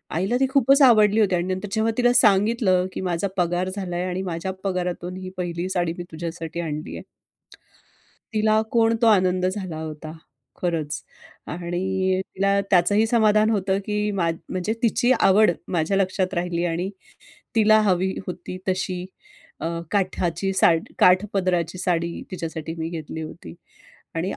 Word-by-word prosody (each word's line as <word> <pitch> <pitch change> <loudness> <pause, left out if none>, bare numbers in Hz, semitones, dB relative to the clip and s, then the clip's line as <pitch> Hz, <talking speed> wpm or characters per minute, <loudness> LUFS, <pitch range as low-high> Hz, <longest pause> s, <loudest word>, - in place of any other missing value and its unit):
आईला 195 +8 +1
ती 265 - +3
खूपच 275 +1 +4
आवडली 215 -4 +6
होती 195 -4 +3
आणि 175 +1 -1
नंतर 190 +3 -5
जेव्हा 225 0 +1
तिला 245 0 +4
सांगितलं, 210 -4 +3
की - - -4
"माझा 180 +1 -1
पगार 175 +1 0
झालाय 180 -2 -3
आणि 185 +1 -3
माझ्या 170 +3 -3
पगारातून 180 -1 -3
ही 185 0 -7
पहिली 175 0 -3
साडी 175 -3 0
मी 175 - -5
तुझ्यासाठी 165 0 -6
आणली 155 -1 -5
आहे." - - -10 1.3
तिला 215 0 +3
कोण 230 -1 +3
तो 230 - +5
आनंद 185 -3 +3
झाला 185 -4 -3
होता 155 0 -7 0.5
खरंच. 160 -4 -2 0.4
आणि 185 +2 -1 0.2
तिला 200 +1 +2
त्याचंही 205 +5 +4
समाधान 215 -2 +3
होतं 195 -2 +1
की 210 0 -1
मा 175 -4 0 0.2
म्हणजे 185 +4 -2
तिची 240 +2 +2
आवड 195 0 +5 0.2
माझ्या 175 +3 +1
लक्षात 185 -1 0
राहिली 175 -1 -1
आणि 175 +3 -2 0.7
तिला 215 0 +5
हवी 190 -2 +1
होती 180 0 -6
तशी 185 -1 -2 0.5
अ, 165 - -2 0.2
काठाची 185 -2 0
सा 190 -2 +5 0.3
काठपदराची 185 -2 +2
साडी 170 -2 -1
तिच्यासाठी 165 -2 -5
मी 160 0 -3
घेतली 160 -1 -6
होती. 160 +2 -9 0.6
आणि 175 +4 -1
185 Hz, 145 wpm, -23 LUFS, 175-210 Hz, 1.3 s, आवडली